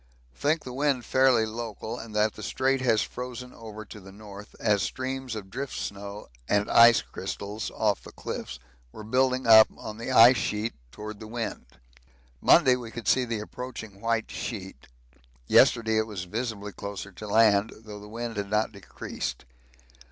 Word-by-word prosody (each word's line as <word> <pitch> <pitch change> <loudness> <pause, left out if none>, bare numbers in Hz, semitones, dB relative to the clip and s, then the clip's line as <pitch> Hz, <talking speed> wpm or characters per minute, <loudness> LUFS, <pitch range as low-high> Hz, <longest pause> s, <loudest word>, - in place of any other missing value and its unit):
Think 155 - 0
the 125 - -7
wind 135 -3 0
fairly 130 -4 +4
local 110 0 -6
and 110 -2 -9
that 105 0 +2
the - - -10
Strait 135 +3 0
has 115 -4 +3
frozen 125 0 -7
over 110 -1 -9
to 105 - -11
the 95 0 -13
north, 100 0 -12
as 105 -3 +2
streams 130 0 -3
of 95 -3 -8
drift 140 +4 -5
snow 100 +1 -6 0.2
and 105 0 +1
ice 115 0 +7
crystals 105 +2 -5
(off 105 -2 +1
the - - -12
cliffs) 65 - -6 0.3
were 110 - -10
building 130 +3 +1
up 110 -1 +9
the 110 +3 -8
ice 120 +1 +8
sheet 110 +1 -2 0.2
towards 105 +6 -8
the 110 - -9
wind. 115 - -5 0.7
Monday 130 -1 +6
we 120 -2 -7
could 115 -1 -8
see 130 -1 +3
the 115 -3 -3
approaching 110 -3 -8
white 115 -1 -1
sheet 95 - -6 0.6
yesterday 110 - +4
it 110 - 0
was 100 -4 -5
visibly 105 +1 -4
closer 100 0 -7
to 100 +3 -9
land, 105 0 +4
though 105 -2 -9
the 105 0 -12
wind 115 0 -5
had 100 -1 -3
not 105 +1 +1
decreased. 100 -2 -6
110 Hz, 165 wpm, -27 LUFS, 105-120 Hz, 0.7 s, up